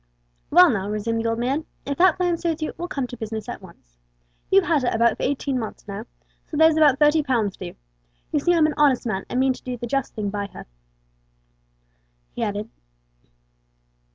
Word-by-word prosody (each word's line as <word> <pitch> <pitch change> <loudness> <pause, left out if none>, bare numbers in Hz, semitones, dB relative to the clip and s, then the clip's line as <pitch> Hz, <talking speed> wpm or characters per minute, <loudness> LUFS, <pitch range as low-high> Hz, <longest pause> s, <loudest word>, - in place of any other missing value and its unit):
"Well 355 +1 +7
now," 200 -3 -2
resumed 225 +2 -1
the 230 - 0
old 230 - -1
man, 270 +6 -1 0.2
"if 280 - -2
that 365 -2 +5
plan 355 -2 +1
suits 330 -2 -2
you, - - -3
we'll 350 - -5
come 275 -6 -2
to 245 - -8
business 220 -1 -5
at 240 - -6
once. - - -17 0.5
You've 390 0 +5
had 320 -5 +2
her 250 - +1
about 235 +1 +3
eighteen 275 -1 -1
months 220 -2 -7
now, 205 +3 -6 0.4
so 305 - -5
there's 320 0 +6
about 295 -4 +5
thirty 295 +1 +4
pounds 235 -9 0
due. 180 -2 -8 0.6
You 300 - +2
see 350 +4 +2
I'm 325 -2 +4
an 310 - +1
honest 280 -5 +3
man, 195 -4 -2
and 250 - -1
mean 265 0 +3
to - - -13
do 250 -1 -5
the 240 - -5
just 275 +3 -2
thing 205 -2 -2
by 205 -1 -3
her," - - -9 1.7
he - - -6
added. 205 +1 -2
255 Hz, 200 wpm, -23 LUFS, 220-305 Hz, 1.7 s, Well